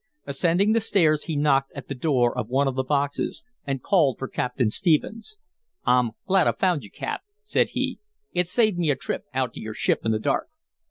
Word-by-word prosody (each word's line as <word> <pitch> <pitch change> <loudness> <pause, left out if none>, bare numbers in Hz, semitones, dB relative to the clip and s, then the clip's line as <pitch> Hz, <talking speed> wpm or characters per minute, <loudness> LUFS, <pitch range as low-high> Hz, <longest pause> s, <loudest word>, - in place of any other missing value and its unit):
Ascending 170 +8 +2
the 230 +1 +3
stairs, 160 -8 +2
he 160 - -3
knocked 140 -2 +2
at 140 -3 -8
the - - -3
door 125 -3 +1
of 105 - -2
one 135 +2 +2
of 135 - 0
the 130 - 0
boxes 145 +1 -1 0.2
and 135 -2 -2
called 155 - +3
for 135 - -4
Captain 125 -3 -1
Stephens. 210 - 0 0.5
"I'm 125 -3 +3
glad 190 -3 +3
I - - +3
found 180 -6 +1
you, 100 - -11
Cap," - - -4 0.2
said 425 - +1
he. - - -2 0.3
"It 180 -1 +1
saved 215 -2 +2
me 165 -3 +1
a 145 - +3
trip 130 - -4
out 130 -3 -1
to - - -8
your 110 0 -6
ship - - +1
in 110 - +1
the 110 - +2
dark." 110 - 0
145 Hz, 210 wpm, -25 LUFS, 130-175 Hz, 0.5 s, the